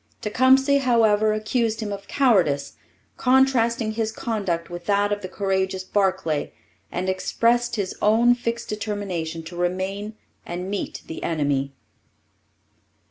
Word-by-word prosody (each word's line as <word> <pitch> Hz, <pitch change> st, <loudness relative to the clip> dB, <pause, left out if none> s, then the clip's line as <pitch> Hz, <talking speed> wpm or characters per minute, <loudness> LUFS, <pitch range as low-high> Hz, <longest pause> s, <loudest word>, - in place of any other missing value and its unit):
Tecumseh, 265 Hz, +5 st, +4 dB
however, 220 Hz, -5 st, +3 dB
accused 220 Hz, +1 st, 0 dB
him 210 Hz, -2 st, -3 dB
of 200 Hz, 0 st, -8 dB
cowardice, 180 Hz, -, +2 dB, 0.4 s
contrasting 250 Hz, -3 st, +3 dB
his 220 Hz, 0 st, -2 dB
conduct 195 Hz, -8 st, -2 dB
with 175 Hz, 0 st, -8 dB
that 205 Hz, 0 st, +2 dB
of 205 Hz, 0 st, -1 dB
the 185 Hz, -, -5 dB
courageous 190 Hz, -1 st, -1 dB
Barclay, 190 Hz, -6 st, 0 dB, 0.4 s
and 185 Hz, -, -3 dB
expressed 235 Hz, +5 st, +1 dB
his 200 Hz, -4 st, -2 dB
own 230 Hz, +3 st, +5 dB
fixed 235 Hz, -1 st, -3 dB
determination 200 Hz, -6 st, -4 dB
to 170 Hz, +2 st, -9 dB
remain 190 Hz, +4 st, -2 dB, 0.3 s
and 180 Hz, +2 st, -5 dB
meet 205 Hz, -, -4 dB
the 160 Hz, -, -7 dB
enemy. 140 Hz, -4 st, -1 dB
205 Hz, 125 wpm, -23 LUFS, 185-230 Hz, 0.4 s, own